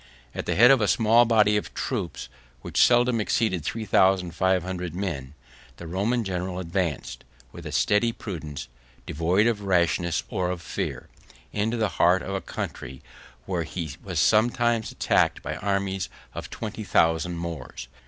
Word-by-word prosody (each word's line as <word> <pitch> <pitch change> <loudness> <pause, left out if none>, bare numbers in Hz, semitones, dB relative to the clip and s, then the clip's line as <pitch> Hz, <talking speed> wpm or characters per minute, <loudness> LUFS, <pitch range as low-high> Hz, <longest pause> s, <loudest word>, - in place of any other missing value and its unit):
At - - -5
the - - 0
head 120 +4 +7
of 135 -4 +4
a 105 - +2
small 115 +2 +4
body 105 -2 +4
of 105 - -5
troops, 95 - -3 0.4
which - - 0
seldom 120 -1 +4
exceeded 105 -6 0
three 110 +6 -3
thousand 95 -3 +3
five 95 -1 +2
hundred 90 -2 -5
men, 75 -8 -4 0.4
the 85 - -9
Roman 100 +8 0
general 90 -2 -3
advanced, 85 -3 -3 0.3
with - - -9
a - - -6
steady 115 +3 +2
prudence, 80 - -7 0.4
devoid 85 +7 +1
of 115 -3 +1
rashness 85 -3 +1
or 90 -1 -2
of 90 -1 -3
fear, - - -4 0.5
into 110 +3 0
the 110 -1 +1
heart 90 +2 +4
of 95 - -5
a 95 - -2
country, 65 +1 -6 0.4
where 90 -3 -2
he 80 -3 -5
was 90 -4 -3
sometimes 115 +5 +2
attacked - - +1
by - - -4
armies 95 -2 -1 0.2
of - - -7
twenty - - -6
thousand 80 +1 +2
Moors. 85 -7 -6
95 Hz, 160 wpm, -25 LUFS, 85-110 Hz, 0.5 s, head